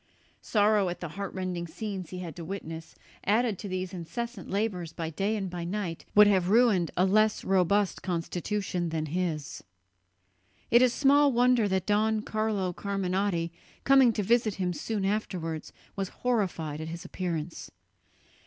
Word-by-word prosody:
Sorrow 205 Hz, -3 st, +3 dB
at 175 Hz, -, -5 dB
the 175 Hz, -, -5 dB
heartrending 185 Hz, -1 st, -4 dB
scenes 190 Hz, 0 st, -5 dB
he 185 Hz, -, -7 dB
had 175 Hz, -4 st, -6 dB
to 170 Hz, -, -7 dB
witness, 165 Hz, -3 st, -7 dB, 0.3 s
added 220 Hz, -1 st, +2 dB
to 205 Hz, -, -6 dB
these 185 Hz, 0 st, -3 dB
incessant 235 Hz, +8 st, -5 dB
labours 190 Hz, -5 st, -2 dB
by 170 Hz, -, -5 dB
night 150 Hz, -, -18 dB
and 205 Hz, -1 st, 0 dB
by 175 Hz, -1 st, -5 dB
day, 175 Hz, -2 st, -3 dB, 0.2 s
would 210 Hz, 0 st, +9 dB
have 190 Hz, -3 st, +3 dB
ruined 215 Hz, -6 st, +4 dB
a 180 Hz, -, +4 dB
less 215 Hz, +2 st, +3 dB
robust 195 Hz, +1 st, +2 dB
constitution 180 Hz, +1 st, -2 dB
than 160 Hz, -1 st, -2 dB
his. 155 Hz, -2 st, -3 dB, 1.1 s
It 240 Hz, -, +7 dB
is 255 Hz, -1 st, +5 dB
small 285 Hz, +2 st, +4 dB
wonder 245 Hz, -2 st, +4 dB
that 190 Hz, -1 st, 0 dB
Don 215 Hz, +1 st, +2 dB
Carlo 215 Hz, -5 st, -1 dB
Carminati, 190 Hz, -3 st, -1 dB, 0.3 s
coming 270 Hz, -3 st, +6 dB
to 210 Hz, -, -1 dB
visit 230 Hz, 0 st, +2 dB
him 180 Hz, -2 st, -1 dB
soon 205 Hz, +4 st, -2 dB
afterwards, 180 Hz, -6 st, -2 dB, 0.2 s
was 195 Hz, -2 st, -2 dB
horrified 180 Hz, -11 st, -1 dB
at 160 Hz, -, -5 dB
his 170 Hz, +3 st, -7 dB
appearance. 170 Hz, -3 st, -4 dB
190 Hz, 155 wpm, -28 LUFS, 175-215 Hz, 1.1 s, would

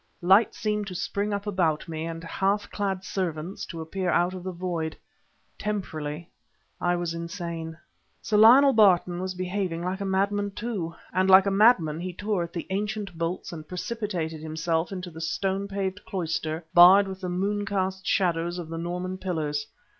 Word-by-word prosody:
Light 195 Hz, +5 st, +5 dB
seemed 210 Hz, -1 st, -1 dB
to 185 Hz, -, -6 dB
spring 200 Hz, +4 st, -2 dB
up 200 Hz, 0 st, -2 dB
about 175 Hz, -7 st, 0 dB
me, 160 Hz, -1 st, -4 dB
and 165 Hz, 0 st, -6 dB
half 195 Hz, +4 st, -1 dB
clad 195 Hz, -2 st, -2 dB
servants 180 Hz, -2 st, -3 dB
to 165 Hz, -2 st, -6 dB
appear 180 Hz, +3 st, -3 dB
out 175 Hz, +1 st, +2 dB
of 185 Hz, -1 st, -7 dB
the 185 Hz, -, -3 dB
void. 170 Hz, -3 st, -3 dB, 0.6 s
Temporarily 170 Hz, -6 st, -4 dB, 0.5 s
I 175 Hz, 0 st, +2 dB
was 175 Hz, -1 st, -2 dB
insane. 170 Hz, -1 st, -5 dB, 0.4 s
Sir 210 Hz, -, -2 dB
Lionel 260 Hz, +6 st, +8 dB
Barton 180 Hz, -4 st, +4 dB
was 185 Hz, 0 st, -3 dB
behaving 180 Hz, -2 st, -2 dB
like 185 Hz, +2 st, -3 dB
a -, -, -2 dB
madman 200 Hz, +1 st, 0 dB
too, 200 Hz, -8 st, -4 dB, 0.2 s
and 185 Hz, +1 st, +2 dB
like 190 Hz, +1 st, +8 dB
a 200 Hz, -, +1 dB
madman 195 Hz, -7 st, +4 dB
he 180 Hz, +1 st, -4 dB
tore 205 Hz, 0 st, -1 dB
at 170 Hz, 0 st, -4 dB
the 170 Hz, -, -5 dB
ancient 205 Hz, -1 st, -3 dB
bolts 165 Hz, +2 st, -3 dB
and 155 Hz, -2 st, -8 dB
precipitated 180 Hz, -5 st, -4 dB
himself 160 Hz, +2 st, -1 dB
into 180 Hz, -2 st, -6 dB
the 160 Hz, 0 st, -9 dB
stone 195 Hz, +4 st, -1 dB
paved 195 Hz, 0 st, -3 dB
cloister 165 Hz, -3 st, -3 dB
barred 185 Hz, +3 st, +8 dB
with 190 Hz, 0 st, -7 dB
the 180 Hz, -, -3 dB
moon 200 Hz, +3 st, -1 dB
cast 190 Hz, -1 st, -2 dB
shadows 175 Hz, -2 st, +1 dB
of 170 Hz, -3 st, -6 dB
the 165 Hz, 0 st, -4 dB
Norman 180 Hz, +2 st, -4 dB
pillars. 150 Hz, -6 st, -2 dB
185 Hz, 175 wpm, -26 LUFS, 165-200 Hz, 0.6 s, Lionel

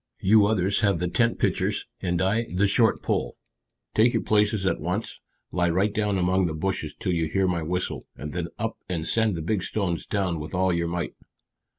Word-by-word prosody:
"You 105 Hz, +1 st, +5 dB
others 100 Hz, -2 st, +1 dB
have 100 Hz, -5 st, +2 dB
the 90 Hz, +2 st, -1 dB
tent 115 Hz, +7 st, +1 dB
pitchers, -, -, 0 dB, 0.2 s
and 90 Hz, +1 st, 0 dB
I 110 Hz, +5 st, +1 dB
the 95 Hz, +3 st, +2 dB
short 110 Hz, +2 st, +3 dB
pole. -, -, -1 dB, 0.6 s
Take 115 Hz, +3 st, +4 dB
your 115 Hz, -, 0 dB
places 105 Hz, -1 st, +2 dB
at 95 Hz, -, +1 dB
once; 90 Hz, +7 st, -3 dB, 0.3 s
lie 90 Hz, -1 st, +1 dB
right 95 Hz, +5 st, +1 dB
down 105 Hz, -3 st, 0 dB
among 90 Hz, 0 st, +2 dB
the 80 Hz, -, -3 dB
bushes 80 Hz, -3 st, -3 dB
till 90 Hz, -, -2 dB
you 80 Hz, -2 st, 0 dB
hear 95 Hz, +4 st, +1 dB
my 85 Hz, -2 st, 0 dB
whistle, 90 Hz, +3 st, -3 dB
and 75 Hz, +1 st, -7 dB
then -, -, -2 dB
up -, -, -3 dB
and 85 Hz, -3 st, -2 dB
send 110 Hz, +1 st, +2 dB
the 80 Hz, -, -4 dB
big 100 Hz, +3 st, 0 dB
stones 90 Hz, -4 st, -2 dB
down 95 Hz, -5 st, -1 dB
with 75 Hz, +4 st, -6 dB
all 95 Hz, 0 st, +2 dB
your 85 Hz, 0 st, 0 dB
might." 85 Hz, -1 st, -3 dB
95 Hz, 205 wpm, -25 LUFS, 85-105 Hz, 0.6 s, You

